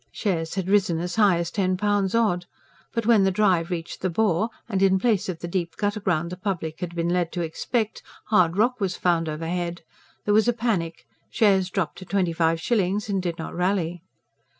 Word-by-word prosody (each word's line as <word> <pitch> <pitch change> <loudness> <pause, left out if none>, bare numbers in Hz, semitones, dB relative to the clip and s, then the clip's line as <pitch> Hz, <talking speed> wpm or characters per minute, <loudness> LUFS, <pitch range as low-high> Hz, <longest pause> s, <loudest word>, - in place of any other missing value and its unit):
Shares 165 -6 -2
had 190 -2 -2
risen 190 -4 +2
as 175 +1 -3
high 200 -5 +5
as 170 0 -2
ten 185 -2 0
pounds 205 0 +1
odd; 180 -6 +1 0.4
but 230 -2 -2
when 225 -3 +5
the 190 - +4
drive 185 -4 +2
reached 170 -2 -5
the 185 - 0
bore 205 +2 +1 0.2
and, 195 -4 -1
in 190 -1 +5
place 210 -2 +1
of 170 -3 -5
the 175 - -4
deep 170 -1 -2
gutter 205 +1 -1
ground 175 -4 0
the 180 - -5
public 175 -5 -3
had 175 -2 -5
been 170 0 0
led 175 -1 0
to 175 - -2
expect, 215 +7 -2 0.2
hard 180 -5 +3
rock 245 +3 +2
was 185 -2 -1
found 165 -2 +1
overhead, 170 +2 -3 0.4
there 205 - +2
was 220 +2 +4
a 240 - +4
panic; 175 - -2 0.2
shares 195 -4 +3
dropped 185 -3 -2
to 185 - -9
twenty 185 -3 0
five 165 0 +1
shillings 205 +1 0
and 195 -2 0
did 170 -2 -3
not 160 - -6
rally. 175 -2 -1
185 Hz, 205 wpm, -24 LUFS, 170-205 Hz, 0.4 s, high